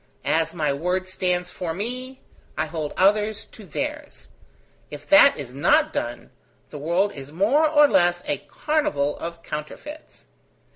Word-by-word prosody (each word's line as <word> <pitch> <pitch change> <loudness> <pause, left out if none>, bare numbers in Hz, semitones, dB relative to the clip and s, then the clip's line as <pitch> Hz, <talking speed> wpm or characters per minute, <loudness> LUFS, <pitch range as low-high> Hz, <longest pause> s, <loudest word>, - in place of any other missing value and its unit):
As 165 0 +1
my 155 -4 -1
word 180 +6 -1
stands 180 -1 -1
for 165 -3 -4
me, 255 +6 -5 0.4
I 155 - 0
hold 155 -1 -4
others 210 +2 +2
to 215 - -13
theirs. 295 - -6 0.6
If - - -10
that 295 -1 +7
is 130 -4 -7
not 140 - +3
done, - - -4 0.4
the 150 - -7
world 175 +7 +1
is 135 0 -10
more 245 - +3
or 295 -1 +6
less 175 -6 +2
a - - -1
carnival 150 - -1
of 170 0 -7
counterfeits. 280 - -8
180 Hz, 145 wpm, -23 LUFS, 155-255 Hz, 0.6 s, that